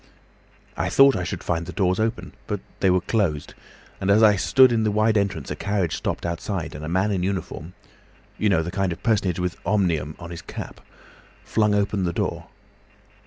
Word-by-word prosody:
I 85 Hz, -, -1 dB
had 95 Hz, -, -3 dB
thought 135 Hz, 0 st, +7 dB
I 90 Hz, -, -1 dB
should 90 Hz, -, -5 dB
find 85 Hz, -1 st, -2 dB
the -, -, -5 dB
doors 95 Hz, +1 st, +1 dB
open, 110 Hz, +2 st, -2 dB
but 105 Hz, -2 st, -2 dB, 0.2 s
they 95 Hz, -, +3 dB
were 90 Hz, 0 st, +3 dB
closed, 85 Hz, -9 st, -1 dB, 0.5 s
and 95 Hz, -, -2 dB
as 105 Hz, +3 st, +5 dB
I 105 Hz, -2 st, +7 dB
stood 130 Hz, +7 st, +5 dB
in 115 Hz, -1 st, +2 dB
the 110 Hz, -, +2 dB
wide 110 Hz, +1 st, +2 dB
entrance 100 Hz, -8 st, -1 dB
a -, -, -2 dB
carriage 100 Hz, -4 st, -1 dB
stopped -, -, -3 dB
outside, 85 Hz, +1 st, -3 dB
and 75 Hz, -, -8 dB
a 75 Hz, -, -4 dB
man 95 Hz, +4 st, +1 dB
in 95 Hz, -3 st, 0 dB
uniform—you 95 Hz, +2 st, -5 dB
know 85 Hz, -5 st, +2 dB
the 85 Hz, -, -5 dB
kind 95 Hz, -1 st, 0 dB
of 85 Hz, -, -7 dB
personage 100 Hz, -7 st, +1 dB
with 90 Hz, -1 st, -2 dB
'Omnium' 85 Hz, -8 st, 0 dB
on 85 Hz, -1 st, -9 dB
his 85 Hz, -, -7 dB
cap—flung 105 Hz, -2 st, -4 dB
open 100 Hz, -1 st, 0 dB
the 85 Hz, -, -1 dB
door. -, -, -3 dB
95 Hz, 195 wpm, -23 LUFS, 85-105 Hz, 0.5 s, thought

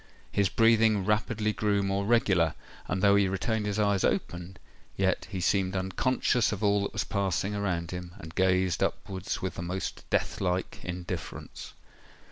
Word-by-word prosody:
His 100 Hz, -2 st, +2 dB
breathing 110 Hz, -3 st, +4 dB
rapidly 105 Hz, 0 st, +1 dB
grew 100 Hz, +1 st, +1 dB
more 100 Hz, 0 st, 0 dB
regular; 95 Hz, -9 st, +3 dB, 0.3 s
and 95 Hz, 0 st, -2 dB
though 100 Hz, 0 st, +6 dB
he 100 Hz, -1 st, +4 dB
retained 105 Hz, +3 st, -1 dB
his 100 Hz, 0 st, -1 dB
eyes 100 Hz, -2 st, +2 dB
open, 90 Hz, +2 st, -1 dB, 0.4 s
yet 95 Hz, -1 st, +1 dB
he 95 Hz, -3 st, -4 dB
seemed 95 Hz, +1 st, +1 dB
unconscious 115 Hz, +5 st, +1 dB
of 105 Hz, 0 st, -4 dB
all 100 Hz, 0 st, +3 dB
that 100 Hz, -, -3 dB
was -, -, 0 dB
passing 100 Hz, 0 st, -1 dB
around 90 Hz, -4 st, -2 dB
him, 90 Hz, 0 st, -7 dB
and 80 Hz, -5 st, -10 dB
gazed 95 Hz, -1 st, +2 dB
upwards 95 Hz, -1 st, -2 dB
with 95 Hz, -, -2 dB
the -, -, -6 dB
most 90 Hz, +2 st, -4 dB
death -, -, 0 dB
like 90 Hz, -1 st, -1 dB
indifference. 90 Hz, -2 st, -6 dB
95 Hz, 160 wpm, -29 LUFS, 90-105 Hz, 0.4 s, though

